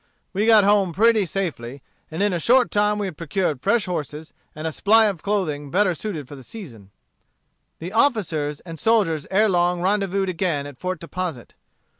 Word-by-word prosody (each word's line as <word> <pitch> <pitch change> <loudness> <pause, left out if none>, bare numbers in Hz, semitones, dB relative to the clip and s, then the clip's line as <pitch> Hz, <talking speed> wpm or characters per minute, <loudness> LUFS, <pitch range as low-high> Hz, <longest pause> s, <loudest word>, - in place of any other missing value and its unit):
We 205 +3 0
got 220 -2 +7
home 200 -3 +3
pretty 220 0 +3
safely, 140 -9 -4 0.3
and 160 +5 -2
in 205 -2 +1
a 175 - -1
short 245 +7 +3
time 210 0 +2
we 205 - -2
had 180 -6 -6
procured 165 -4 -2
fresh 235 - +1
horses, 155 -3 -5 0.2
and 155 +1 -7
a 160 - -1
supply 220 +7 +4
of 195 -7 -2
clothing 160 -9 -2
better 185 +3 +2
suited 165 -6 -5
for 145 - -10
the 135 - -11
season." 125 - -11 0.9
The 175 +4 -7
officers 170 - 0
and 165 -3 -9
soldiers 190 -9 +1
ere 210 +3 +3
long 175 -2 +1
rendezvoused 195 +1 0
again 165 -5 -1
at 145 -3 -11
Fort 185 -2 -3
Deposit. 170 -6 -6
185 Hz, 180 wpm, -22 LUFS, 155-205 Hz, 0.9 s, got